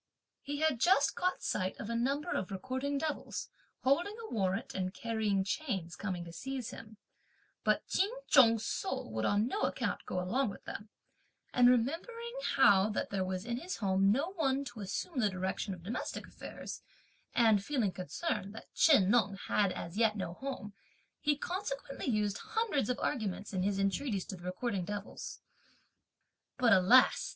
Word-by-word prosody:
He 290 Hz, +1 st, -4 dB
had 315 Hz, -6 st, +2 dB
just 365 Hz, +9 st, +4 dB
caught 365 Hz, 0 st, -1 dB
sight 185 Hz, -1 st, -1 dB
of -, -, -5 dB
a 235 Hz, -, -2 dB
number 280 Hz, +8 st, 0 dB
of 190 Hz, -, -1 dB
recording 260 Hz, +8 st, -2 dB
devils, 305 Hz, 0 st, -3 dB, 0.3 s
holding 345 Hz, +11 st, +2 dB
a 455 Hz, -1 st, -8 dB
warrant 195 Hz, -2 st, -1 dB
and 185 Hz, -1 st, -2 dB
carrying 215 Hz, -3 st, 0 dB
chains, 190 Hz, -, -2 dB
coming 180 Hz, -3 st, -4 dB
to 170 Hz, -, -10 dB
seize 260 Hz, +2 st, -4 dB
him, 215 Hz, -1 st, -11 dB, 0.7 s
but -, -, +2 dB
Ch'in 390 Hz, +2 st, +2 dB, 0.2 s
Chung's 230 Hz, -6 st, +6 dB
soul 130 Hz, -3 st, -3 dB
would 110 Hz, 0 st, -1 dB
on 205 Hz, +2 st, +3 dB
no 405 Hz, -, -2 dB
account -, -, -1 dB
go 180 Hz, -, -1 dB
along 220 Hz, +8 st, +1 dB
with -, -, -9 dB
them; 205 Hz, +1 st, -7 dB, 0.6 s
and 245 Hz, 0 st, +6 dB
remembering 335 Hz, -, 0 dB, 0.2 s
how 205 Hz, -5 st, +6 dB
that 210 Hz, -, -2 dB
there 195 Hz, -2 st, 0 dB
was 185 Hz, +1 st, -3 dB
in 240 Hz, 0 st, -2 dB
his 350 Hz, +8 st, -4 dB
home 195 Hz, -1 st, +3 dB
no 285 Hz, -, +1 dB
one 280 Hz, -6 st, 0 dB
to 240 Hz, -3 st, -8 dB
assume 210 Hz, -, -3 dB
the 215 Hz, -4 st, +3 dB
direction 190 Hz, +2 st, -2 dB
of 180 Hz, -3 st, -7 dB
domestic 215 Hz, +7 st, -4 dB
affairs, -, -, -8 dB, 0.5 s
and 220 Hz, -4 st, +5 dB
feeling 240 Hz, -7 st, 0 dB
concerned 200 Hz, -, -3 dB
that -, -, -11 dB
Chih 300 Hz, -8 st, +6 dB
Neng 205 Hz, -2 st, +3 dB
had 200 Hz, -3 st, +3 dB
as 170 Hz, +1 st, -6 dB
yet 220 Hz, -2 st, +3 dB
no 180 Hz, -3 st, -3 dB
home, 255 Hz, -3 st, -6 dB, 0.5 s
he 295 Hz, -1 st, +1 dB
consequently 290 Hz, -6 st, -4 dB
used 210 Hz, -4 st, +1 dB
hundreds 440 Hz, -, 0 dB
of 250 Hz, -, 0 dB
arguments 205 Hz, -3 st, -2 dB
in 185 Hz, -, 0 dB
his 195 Hz, +1 st, +1 dB
entreaties 195 Hz, +1 st, 0 dB
to 195 Hz, -, -6 dB
the 175 Hz, -1 st, -12 dB
recording 185 Hz, +1 st, -2 dB
devils; 205 Hz, +3 st, -6 dB, 1.2 s
but 245 Hz, -3 st, +5 dB
alas! 195 Hz, +8 st, +5 dB
225 Hz, 170 wpm, -33 LUFS, 195-275 Hz, 1.2 s, Chung's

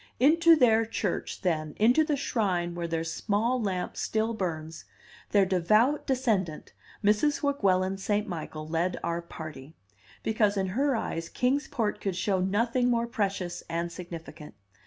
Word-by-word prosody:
Into 330 Hz, +5 st, +6 dB
their 225 Hz, -6 st, +4 dB
church, 215 Hz, -3 st, -3 dB
then, 155 Hz, -4 st, -1 dB
into 245 Hz, +9 st, +5 dB
the 305 Hz, -1 st, 0 dB
shrine 185 Hz, -10 st, -1 dB
where 170 Hz, 0 st, -3 dB
their 165 Hz, -1 st, -1 dB
small 220 Hz, +8 st, 0 dB
lamp 185 Hz, -4 st, -2 dB
still 220 Hz, +1 st, -1 dB
burns, 160 Hz, -6 st, -4 dB, 0.4 s
their 200 Hz, -2 st, +4 dB
devout 215 Hz, -, +2 dB
descendant, 220 Hz, -, -1 dB, 0.3 s
Mrs. 215 Hz, +10 st, +2 dB
Weguelin 195 Hz, -9 st, +1 dB
St. 210 Hz, +2 st, 0 dB
Michael 155 Hz, -4 st, -6 dB
led 170 Hz, +3 st, -1 dB
our 170 Hz, 0 st, -1 dB
party, 155 Hz, -3 st, -9 dB, 0.5 s
because 210 Hz, -2 st, +1 dB
in 190 Hz, -1 st, 0 dB
her 270 Hz, +7 st, +1 dB
eyes 165 Hz, -6 st, -3 dB
Kings 270 Hz, +4 st, 0 dB
Port 220 Hz, -4 st, -2 dB
could 195 Hz, -3 st, -2 dB
show 190 Hz, +1 st, 0 dB
nothing 230 Hz, +6 st, +1 dB
more 235 Hz, -1 st, +2 dB
precious 195 Hz, -6 st, -2 dB
and 170 Hz, +1 st, -2 dB
significant. 170 Hz, -3 st, -9 dB
200 Hz, 145 wpm, -28 LUFS, 170-230 Hz, 0.5 s, Into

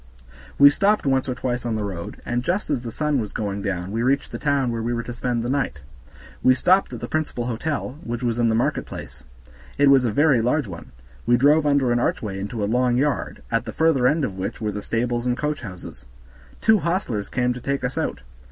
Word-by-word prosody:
We 140 Hz, 0 st, +9 dB
stopped 205 Hz, +4 st, +2 dB
once 135 Hz, -1 st, +1 dB
or 125 Hz, -, -1 dB
twice 125 Hz, -1 st, -2 dB
on 120 Hz, -2 st, -1 dB
the 110 Hz, -, -2 dB
road, 90 Hz, -4 st, -6 dB
and 120 Hz, 0 st, -1 dB
just 180 Hz, +4 st, -1 dB
as 135 Hz, -5 st, 0 dB
the 120 Hz, -, -6 dB
sun 150 Hz, +1 st, 0 dB
was 105 Hz, -, -5 dB
going 100 Hz, -2 st, -3 dB
down 95 Hz, -1 st, -3 dB
we 115 Hz, +2 st, -1 dB
reached 135 Hz, +4 st, +1 dB
the -, -, -5 dB
town 140 Hz, -4 st, +1 dB
where 115 Hz, -1 st, -2 dB
we 120 Hz, +2 st, -1 dB
were 120 Hz, -, -2 dB
to 120 Hz, -, -6 dB
spend 120 Hz, -1 st, -2 dB
the -, -, -2 dB
night. 135 Hz, -, -1 dB, 0.6 s
We 130 Hz, -, +5 dB
stopped 185 Hz, +8 st, +3 dB
at -, -, -7 dB
the -, -, -4 dB
principal 150 Hz, -6 st, -2 dB
hotel, 135 Hz, +3 st, -3 dB
which 120 Hz, +1 st, -4 dB
was 120 Hz, -1 st, 0 dB
in 115 Hz, -1 st, +3 dB
the 110 Hz, -, +2 dB
market 115 Hz, -, 0 dB
place; -, -, -9 dB, 0.6 s
it 145 Hz, -1 st, +5 dB
was 135 Hz, -2 st, +6 dB
a 120 Hz, -, +1 dB
very 140 Hz, 0 st, +4 dB
large 125 Hz, +3 st, +1 dB
one; 85 Hz, -3 st, -9 dB, 0.4 s
we 120 Hz, 0 st, +5 dB
drove 150 Hz, +4 st, +4 dB
under 140 Hz, -4 st, +3 dB
an 120 Hz, -, +2 dB
archway 105 Hz, -5 st, -1 dB
into 105 Hz, +2 st, -4 dB
a -, -, +2 dB
long 125 Hz, +3 st, +2 dB
yard, 145 Hz, +1 st, -1 dB
at 115 Hz, +1 st, +1 dB
the -, -, -5 dB
further 160 Hz, -6 st, +3 dB
end 150 Hz, +1 st, +2 dB
of 95 Hz, -1 st, -6 dB
which 95 Hz, -, -4 dB
were 105 Hz, -2 st, -2 dB
the 105 Hz, 0 st, -5 dB
stables 120 Hz, +2 st, -1 dB
and 125 Hz, 0 st, +1 dB
coachhouses. 130 Hz, -, -5 dB, 0.6 s
Two 220 Hz, -1 st, +5 dB
hostlers 170 Hz, -, -2 dB
came 125 Hz, -1 st, 0 dB
to 125 Hz, -, -8 dB
take 140 Hz, +2 st, -2 dB
us 125 Hz, -, -2 dB
out. -, -, -2 dB
125 Hz, 235 wpm, -23 LUFS, 115-140 Hz, 0.6 s, We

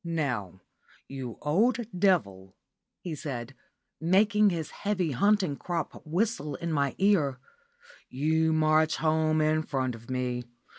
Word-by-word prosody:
"Now, 125 Hz, -, -3 dB, 0.5 s
you 130 Hz, -4 st, -6 dB
old 210 Hz, +12 st, +3 dB, 0.2 s
devil," 100 Hz, -, +1 dB, 0.5 s
he 175 Hz, -, -5 dB
said, 135 Hz, -5 st, -5 dB, 0.5 s
making 205 Hz, +5 st, +4 dB
his 165 Hz, -4 st, -3 dB
heavy 190 Hz, -6 st, -1 dB
hunting 190 Hz, +2 st, +2 dB
crop 170 Hz, 0 st, -4 dB
whistle 170 Hz, -, -1 dB
in 170 Hz, +3 st, -3 dB
my 140 Hz, -2 st, 0 dB
ear, 175 Hz, -10 st, +2 dB, 0.7 s
"you 160 Hz, +4 st, +1 dB
march 155 Hz, 0 st, +3 dB
home 155 Hz, 0 st, +1 dB
in 155 Hz, 0 st, +2 dB
front 130 Hz, -4 st, -2 dB
of 115 Hz, +1 st, -12 dB
me. 125 Hz, -1 st, -2 dB
155 Hz, 120 wpm, -28 LUFS, 130-175 Hz, 0.7 s, making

